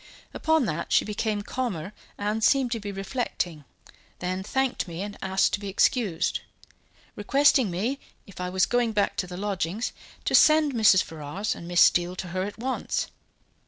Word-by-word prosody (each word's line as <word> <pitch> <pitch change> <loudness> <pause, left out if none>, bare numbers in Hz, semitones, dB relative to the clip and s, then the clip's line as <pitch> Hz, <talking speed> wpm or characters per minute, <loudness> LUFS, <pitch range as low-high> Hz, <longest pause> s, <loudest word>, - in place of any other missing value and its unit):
Upon 320 -4 +2
that, 170 -4 -3
she - - +4
became 210 0 -2
calmer 205 -7 -4 0.2
and 210 +2 -2
seemed 265 0 +3
to 230 - -1
be 205 -1 -5
reflecting, 195 - -3 0.5
then 185 +1 -3
thanked 265 +4 -1
me 170 +2 -5
and 205 0 -6
asked 190 0 +1
to - - 0
be 200 - -6
excused, 195 -2 +1 0.8
requesting 270 +1 +3
me, 220 +11 -2 0.3
if 200 -3 -10
I 180 - -2
was 190 +1 +2
going 240 -2 +1
back 205 -1 +1
to 180 - -1
the 180 0 -7
lodgings, 200 +2 -2 0.3
to - - 0
send 305 -2 +6
Mrs. 215 -5 +5
Ferrars 160 +6 -4
and 170 - -9
Miss 175 0 +3
Steele 175 +1 +4
to 180 -1 -6
her 185 +2 -2
at 200 +2 -4
once. 260 +3 -2
205 Hz, 170 wpm, -26 LUFS, 180-240 Hz, 0.8 s, send